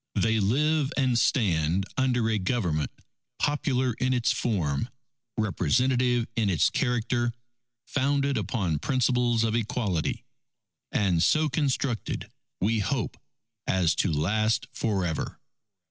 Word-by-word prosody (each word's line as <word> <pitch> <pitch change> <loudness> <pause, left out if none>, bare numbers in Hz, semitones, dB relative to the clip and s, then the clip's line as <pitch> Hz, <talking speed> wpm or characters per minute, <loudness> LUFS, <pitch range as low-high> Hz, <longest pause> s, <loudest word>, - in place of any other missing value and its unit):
They 110 0 +2
live 145 +7 +2
and 130 -3 +2
stand 90 - +2
under 125 -3 +1
a 110 -2 +1
Government 90 - 0 0.5
popular 130 -4 0
in 130 0 +1
its 120 -2 +2
form, 90 - -1 0.5
representative 120 - +2
in 110 -3 +1
its 90 - +3
character, 120 0 0 0.5
founded 140 0 +1
upon 90 - -1
principles 125 - +1
of 110 -1 0
equality, 105 -7 -1 0.7
and 90 -5 +2
so 155 - +3
constructed, 135 -5 -1 0.3
we 110 +4 +1
hope, 100 - -1 0.5
as 90 -4 +2
to - - +1
last 110 +8 +1
for 100 -5 -1
ever.... 80 -3 -3
115 Hz, 115 wpm, -27 LUFS, 95-130 Hz, 0.7 s, its